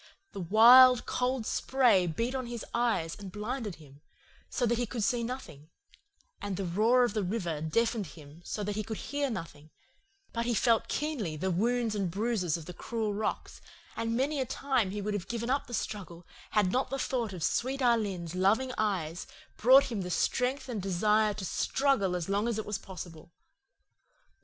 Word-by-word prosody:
The -, -, -7 dB
wild, 240 Hz, +7 st, +8 dB
cold 250 Hz, -2 st, -1 dB
spray 235 Hz, -11 st, +3 dB
beat 230 Hz, +10 st, -2 dB
on 260 Hz, -2 st, -3 dB
his 235 Hz, -1 st, -6 dB
eyes 225 Hz, -9 st, 0 dB
and 200 Hz, -2 st, -9 dB
blinded 215 Hz, -1 st, -4 dB
him, 145 Hz, -2 st, -17 dB, 0.5 s
so 250 Hz, -, 0 dB
that 235 Hz, 0 st, +1 dB
he 245 Hz, -, 0 dB
could 230 Hz, -1 st, -3 dB
see 235 Hz, +3 st, +1 dB
nothing, 230 Hz, -, -7 dB, 0.7 s
and 200 Hz, -3 st, -3 dB
the 195 Hz, -, -2 dB
roar 220 Hz, +8 st, +3 dB
of 245 Hz, -, 0 dB
the 215 Hz, -, 0 dB
river 180 Hz, -6 st, -2 dB
deafened 220 Hz, +5 st, 0 dB
him 150 Hz, +1 st, -14 dB
so 210 Hz, -, -4 dB
that 205 Hz, 0 st, -3 dB
he 215 Hz, -, -1 dB
could 220 Hz, 0 st, -5 dB
hear 285 Hz, 0 st, -2 dB
nothing; 155 Hz, -8 st, -7 dB, 0.6 s
but 235 Hz, 0 st, -2 dB
he 240 Hz, -, +1 dB
felt 230 Hz, +1 st, +2 dB
keenly 270 Hz, -, -2 dB
the 185 Hz, +4 st, -1 dB
wounds 230 Hz, +4 st, +1 dB
and 200 Hz, -4 st, -1 dB
bruises 195 Hz, -4 st, -1 dB
of 165 Hz, -, -10 dB
the 180 Hz, -, -8 dB
cruel 220 Hz, +3 st, -3 dB
rocks, 215 Hz, +2 st, -4 dB, 0.3 s
and 230 Hz, 0 st, -1 dB
many 280 Hz, +2 st, 0 dB
a -, -, 0 dB
time 260 Hz, -8 st, 0 dB
he 205 Hz, +1 st, -4 dB
would 210 Hz, +1 st, -2 dB
have 195 Hz, -2 st, -4 dB
given 235 Hz, +1 st, -3 dB
up 275 Hz, -, 0 dB
the 240 Hz, -, -9 dB
struggle 175 Hz, -6 st, -5 dB, 0.2 s
had 205 Hz, -4 st, +2 dB
not 260 Hz, +3 st, 0 dB
the 270 Hz, -, -2 dB
thought 245 Hz, -5 st, -2 dB
of 180 Hz, -4 st, -6 dB
sweet 265 Hz, +9 st, 0 dB
Alin's 205 Hz, -, 0 dB
loving 205 Hz, +8 st, +2 dB
eyes 185 Hz, -6 st, -1 dB, 0.3 s
brought 260 Hz, +3 st, +6 dB
him 215 Hz, -4 st, -2 dB
the 180 Hz, -, -5 dB
strength 250 Hz, +9 st, 0 dB
and 230 Hz, -5 st, -4 dB
desire 210 Hz, +3 st, +2 dB
to 195 Hz, -, -5 dB
struggle 235 Hz, -6 st, +1 dB
as 175 Hz, -2 st, -3 dB
long 200 Hz, +3 st, 0 dB
as 235 Hz, -2 st, -1 dB
it 220 Hz, -, -3 dB
was 210 Hz, -2 st, -3 dB
possible. 175 Hz, -4 st, -10 dB
215 Hz, 190 wpm, -30 LUFS, 185-245 Hz, 0.7 s, wild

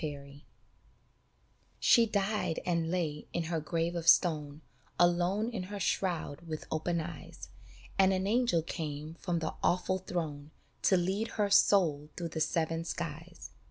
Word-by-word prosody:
BALLAD 140 Hz, -1 st, -6 dB, 1.4 s
SHE 235 Hz, -2 st, +5 dB
died 200 Hz, -4 st, 0 dB
and 170 Hz, -2 st, 0 dB
lay 160 Hz, -4 st, -2 dB
in 170 Hz, -, 0 dB
her 165 Hz, 0 st, -2 dB
grave 165 Hz, +2 st, -1 dB
of 170 Hz, -1 st, -4 dB
stone, 150 Hz, -4 st, +3 dB, 0.4 s
Alone 180 Hz, +6 st, +2 dB
in 220 Hz, -5 st, -3 dB
her 205 Hz, -1 st, -5 dB
shroud 175 Hz, -7 st, -1 dB
with 155 Hz, -1 st, -5 dB
open 170 Hz, +2 st, 0 dB
eyes, 160 Hz, -1 st, -8 dB, 0.5 s
And 190 Hz, 0 st, +6 dB
an 190 Hz, 0 st, 0 dB
angel 225 Hz, -6 st, +2 dB
came 155 Hz, -2 st, -5 dB
from 170 Hz, +1 st, -2 dB
the 160 Hz, -1 st, -2 dB
awful 185 Hz, +1 st, +1 dB
throne 155 Hz, -6 st, -4 dB, 0.4 s
To 190 Hz, -, +5 dB
lead 190 Hz, +5 st, 0 dB
her 205 Hz, -2 st, +1 dB
soul 155 Hz, -8 st, +4 dB
through 170 Hz, -1 st, -3 dB
the 160 Hz, -1 st, -4 dB
seven 165 Hz, 0 st, 0 dB
skies. 165 Hz, +1 st, -6 dB
170 Hz, 145 wpm, -31 LUFS, 155-185 Hz, 1.4 s, And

